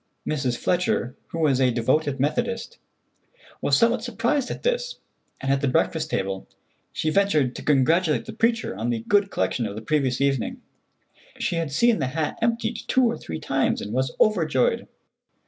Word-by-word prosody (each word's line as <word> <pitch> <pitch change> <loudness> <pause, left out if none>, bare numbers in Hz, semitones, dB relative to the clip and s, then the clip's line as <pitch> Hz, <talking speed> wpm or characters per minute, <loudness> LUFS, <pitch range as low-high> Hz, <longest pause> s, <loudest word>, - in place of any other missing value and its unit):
Mrs. 130 -5 -1
Fletcher, 175 -8 0
who - - -7
was 145 -5 +2
a 130 - +4
devoted 130 +4 +1
Methodist, 235 - -1 0.8
was - - +3
somewhat 230 -1 +3
surprised 245 +3 0
at - - -6
this, - - 0 0.4
and 135 - -1
at 135 - 0
the 140 - +1
breakfast 160 +2 +1
table 95 -7 -2 0.4
she 155 - -1
ventured 155 -10 +2
to - - -6
congratulate 150 +3 +2
the - - -7
preacher 230 - 0
on 110 +4 -2
the 115 -2 -1
good 205 -1 +3
collection 120 - -1
of 100 - -7
the 110 - -6
previous 135 -1 0
evening. 135 -4 0 0.8
She 170 - -1
had 165 -4 -2
seen 235 +7 +3
the 135 - 0
hat 155 -2 -1
emptied 230 0 0
two 260 - +3
or 235 0 +1
three 80 -1 -6
times, - - 0
and 105 - -6
was 130 +1 0
overjoyed. 160 - +2
155 Hz, 170 wpm, -24 LUFS, -, 0.8 s, a